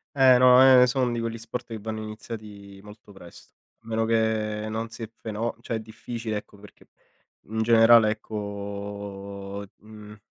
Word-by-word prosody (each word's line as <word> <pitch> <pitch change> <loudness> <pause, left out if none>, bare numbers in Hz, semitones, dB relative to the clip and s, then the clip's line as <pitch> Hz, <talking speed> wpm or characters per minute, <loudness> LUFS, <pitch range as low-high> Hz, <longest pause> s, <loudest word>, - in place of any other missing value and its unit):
Eh, 130 -2 +6
no, 125 0 +7
ehm, 130 -1 +8
sono 125 -1 0
di 120 - -2
quegli 115 0 -4
sport, 115 +2 -6
che 115 -2 -6
vanno 110 +1 -5
iniziati 105 -2 -9
molto 105 0 -15
presto. 90 -3 -15 0.3
A 115 - -24
meno 115 0 -1
che 110 -1 0
non 110 +1 -4
si 115 +1 -10
è 110 - -11
feno 110 +2 -4
cioè 115 -1 -4
è - - -2
difficile 110 0 -6
ecco, 105 0 -14
perché 105 0 -17 0.5
in 110 +2 -3
generale, 115 -1 +6
ecco, 100 -1 -6
mhmm, 105 0 -14
110 Hz, 165 wpm, -25 LUFS, 105-115 Hz, 0.5 s, ehm